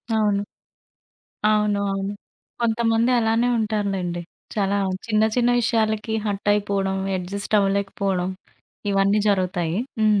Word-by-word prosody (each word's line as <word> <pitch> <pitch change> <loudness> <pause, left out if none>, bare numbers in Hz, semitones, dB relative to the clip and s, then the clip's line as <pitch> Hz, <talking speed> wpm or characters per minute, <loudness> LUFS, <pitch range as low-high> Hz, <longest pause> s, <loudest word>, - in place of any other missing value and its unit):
అవును. 210 -2 +2 1.1
అవును. 210 -1 +2
అవును. 195 +1 -2 0.5
కొంతమంది 230 +1 +2
అలానే 225 +2 +2
ఉంటారులెండి. 200 -5 -1 0.3
చాలా 200 -1 +1 0.3
చిన్న 215 -1 +2
చిన్న 245 0 +3
విషయాలకి 220 -1 0
హర్ట్ 205 0 -2
అయిపోవడం. 200 -2 0 0.2
ఎడ్జస్ట్ 200 +4 -4
అవ్వలేకపోవడం 195 -2 0 0.6
ఇవన్నీ 195 +2 +3
జరుగుతాయి. 180 -2 0 0.2
హ్మ్ 215 -2 +4
205 Hz, 100 wpm, -23 LUFS, 195-220 Hz, 1.1 s, హ్మ్